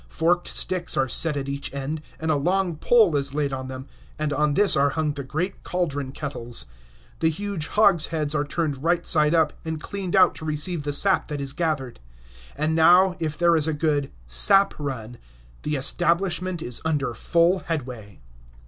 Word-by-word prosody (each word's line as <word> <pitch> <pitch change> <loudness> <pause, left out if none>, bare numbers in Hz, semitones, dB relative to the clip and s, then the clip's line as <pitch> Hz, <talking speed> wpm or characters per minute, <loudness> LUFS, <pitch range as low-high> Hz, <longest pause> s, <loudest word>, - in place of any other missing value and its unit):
Forked 175 +2 0
sticks 180 -1 0
are 135 - +2
set 150 +3 0
at 135 -1 -4
each 140 0 -4
end, 145 +3 -4 0.2
and 160 0 -1
a - - +2
long 180 +4 0
pole 205 0 +3
is 140 0 +1
laid 145 -2 -1
on 130 0 -5
them, 130 0 -7 0.3
and 150 -1 -2
on 150 -1 +1
this 205 -1 +3
are 140 0 +3
hung 155 0 -1
the 145 - -6
great 160 +8 -4
caldron 145 -7 -2
kettles. 135 -5 -5 0.5
The 160 - +2
huge 180 -1 -3
hogsheads 165 -7 +2
are 145 -1 0
turned 145 -2 -3
right 170 +1 +1
side 150 +1 +2
up, 160 -2 +2
and 160 -1 -4
cleaned 195 +2 -4
out 190 - +5
to - - -7
receive 155 +2 -1
the 145 0 -3
sap 195 +6 +2
that 150 -2 -5
is 140 -1 -3
gathered. 155 -8 -2 0.6
And 155 +2 -1
now, 180 +3 +5
if 155 -2 -3
there 170 0 +3
is 155 -1 +3
a 160 - 0
good 145 -2 0 0.2
"sap 60 - +4
run," 120 -5 -6 0.4
the 150 0 -2
establishment 175 +4 +1
is 120 -1 -3
under 145 -6 -1
full 170 +9 +2
headway. 125 - -6
155 Hz, 185 wpm, -24 LUFS, 140-170 Hz, 0.6 s, out